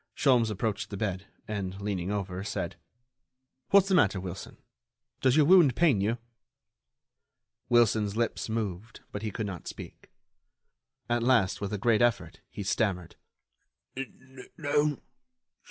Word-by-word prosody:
Sholmes 125 -5 +3
approached 105 0 -2
the 100 - -6
bed, 95 -1 -3 0.2
and, 95 -3 -4
leaning 100 -3 -3
over, 95 -2 -3
said: 105 - -4 0.9
"What's 195 -1 +6
the 195 - +1
matter, 105 - +4
Wilson? 95 0 -7 0.6
Does 130 -1 +3
your 150 - +6
wound 165 -7 +6
pain 150 - +3
you?" 110 +4 0 1.5
Wilson's 110 -3 +3
lips 115 -1 -1
moved, 110 -1 -4
but 105 - -5
he 110 - -2
could 110 +1 -4
not 95 -5 -7
speak. - - -10 1.0
At 120 -1 +1
last, 115 -7 +2
with 100 0 -3
a 105 - -1
great 110 +2 +2
effort, 120 -1 +1
he 100 - -6
stammered: 95 -4 -1 1.4
"No 145 -1 0
110 Hz, 130 wpm, -28 LUFS, 100-120 Hz, 1.5 s, What's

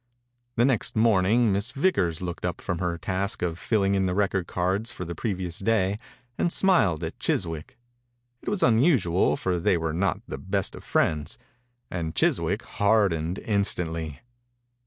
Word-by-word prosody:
The 120 - +4
next 130 -5 +1
morning 110 +1 +4
Miss 100 +4 -1
Vickers 100 - 0
looked 85 -1 -5
up 90 - -2
from 90 -3 -3
her 90 -2 -1
task 95 +3 -2
of 85 -1 -2
filling 100 -3 +1
in 95 -1 +2
the 90 - -1
record 95 -3 0
cards 95 +5 -1
for 90 - -6
the 85 - -5
previous 90 -1 -3
day 100 -1 +1 0.4
and 175 - +2
smiled 140 - +3
at - - -5
Chiswick. 80 -1 -2 0.6
It - - -4
was 205 -2 0
un 115 -2 +5
usual, 110 - +3
for 90 -2 -1
they 85 +1 +2
were 80 -1 -2
not 100 +4 0
the - - -6
best 100 0 -2
of - - -10
friends, 75 -2 0 0.5
and 80 -3 -3
Chiswick 85 +6 +1
hardened 100 -5 +1
instantly. 85 -7 -1
95 Hz, 160 wpm, -26 LUFS, 85-105 Hz, 0.6 s, un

